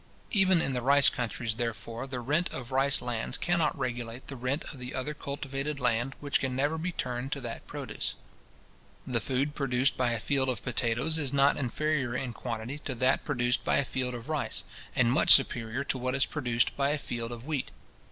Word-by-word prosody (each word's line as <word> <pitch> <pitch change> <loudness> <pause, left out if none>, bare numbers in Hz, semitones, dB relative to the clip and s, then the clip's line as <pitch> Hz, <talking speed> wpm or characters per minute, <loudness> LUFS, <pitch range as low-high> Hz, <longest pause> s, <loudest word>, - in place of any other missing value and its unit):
Even 190 -5 +4
in 135 - -1
the 125 - -1
rice 140 +2 +6
countries, 115 -2 -2
therefore, 115 +1 -4
the 130 -2 -4
rent 150 +8 +1
of 125 -1 -6
rice 135 -1 +3
lands 120 -2 -2
cannot 170 -3 +1
regulate 120 -2 -4
the 140 - -5
rent 125 +4 -1
of 135 - -11
the 125 +1 -6
other 130 +4 -2
cultivated 140 0 -4
land 125 +1 +1
which 145 -1 +1
can 130 -1 -2
never 145 +4 +1
be 175 +3 -2
turned 125 -3 -3
to 145 - -1
that 120 -3 -7
produce. - - -4 0.9
The 120 -2 0
food 135 +5 -1
produced 135 -2 +1
by 125 -2 +2
a 115 - -1
field 135 +3 +1
of 120 -6 -2
potatoes 125 +5 +1
is 140 -4 0
not 140 0 +4
inferior 140 -1 -1
in 130 -2 -2
quantity 120 +4 -4
to 135 -3 -4
that 130 +2 +2
produced 125 -4 +1
by - - +2
a 140 - +2
field 125 -2 -2
of 120 0 -8
rice, 155 - 0 0.3
and 120 -2 +4
much 130 - +8
superior 120 -1 0
to 135 - -2
what 130 +1 -1
is 135 - +4
produced 120 -5 0
by 140 0 +2
a 150 - +1
field 120 -4 -4
of 120 +1 -7
wheat. 150 -4 -2
130 Hz, 200 wpm, -30 LUFS, 120-140 Hz, 0.9 s, much